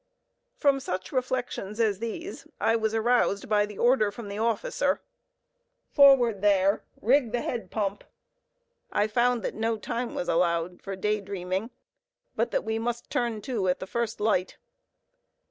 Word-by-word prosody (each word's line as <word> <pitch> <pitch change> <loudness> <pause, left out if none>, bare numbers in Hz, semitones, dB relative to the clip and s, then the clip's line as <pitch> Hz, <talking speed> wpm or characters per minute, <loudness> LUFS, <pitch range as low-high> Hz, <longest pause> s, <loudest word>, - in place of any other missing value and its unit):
From 280 - +3
such 185 -8 -4
reflections 250 -5 -2
as 210 -4 +2
these, 330 - -6
I 225 - +3
was 220 -1 0
aroused 225 -3 +2
by 210 -1 +2
the 210 -1 -10
order 240 -3 +3
from 205 +1 -8
the 200 +1 -5
officer, 230 - 0 0.9
"Forward 255 -8 +6
there! 200 -1 +3 0.2
rig 250 +1 +3
the 240 - -1
head 235 -2 -4
pump!" 205 -2 -2 0.9
I 205 - +2
found 240 +2 +1
that - - -2
no 225 +1 -1
time 235 +3 -4
was 175 - -3
allowed 170 +1 0
for 195 -1 -5
day 210 +2 0
dreaming, 190 +2 -3 0.7
but 230 +2 0
that - - -1
we 220 0 -2
must 235 +1 -4
"turn 235 -3 -1
to" 225 -8 -1
at 180 - +2
the - - -5
first 235 +2 -3
light. 205 -4 0
220 Hz, 155 wpm, -27 LUFS, 200-240 Hz, 0.9 s, Forward